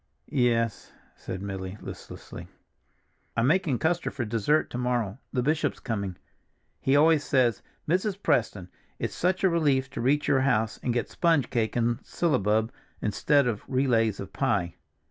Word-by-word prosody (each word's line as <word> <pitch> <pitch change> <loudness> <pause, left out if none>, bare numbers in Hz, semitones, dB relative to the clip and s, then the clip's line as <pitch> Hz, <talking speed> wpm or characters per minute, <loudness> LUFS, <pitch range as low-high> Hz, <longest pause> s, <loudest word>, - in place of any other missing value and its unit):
"Yes," 115 -5 +1 0.2
said 95 +1 -6
Milly 95 0 -5
listlessly. - - -9 0.9
"I'm 115 - +3
making 155 -2 +2
custard 170 +7 -1
for 125 -3 -2
dessert 115 +8 +1
to 125 - -4
morrow; 120 -3 -1
the 125 - 0
bishop's 150 +1 0
coming. 100 -6 -3 0.6
He 135 - +2
always 155 0 +5
says, 125 -8 +2 0.3
'Mrs. 185 +4 +1
Preston, 110 - 0 0.3
it's - - -3
such 185 +2 0
a 190 - +5
relief 140 -6 +1
to - - -4
reach 145 +4 +2
your 135 - +3
house 115 -5 +1
and 125 - -1
get 120 0 -2
sponge 165 -6 +2
cake 115 -3 0
and 120 0 +1
syllabub, 110 - +1 0.3
instead 140 +7 +2
of 115 -4 -1
relays 115 -6 +1
of 100 - -7
pie! 85 -4 0
125 Hz, 150 wpm, -27 LUFS, 110-145 Hz, 0.9 s, always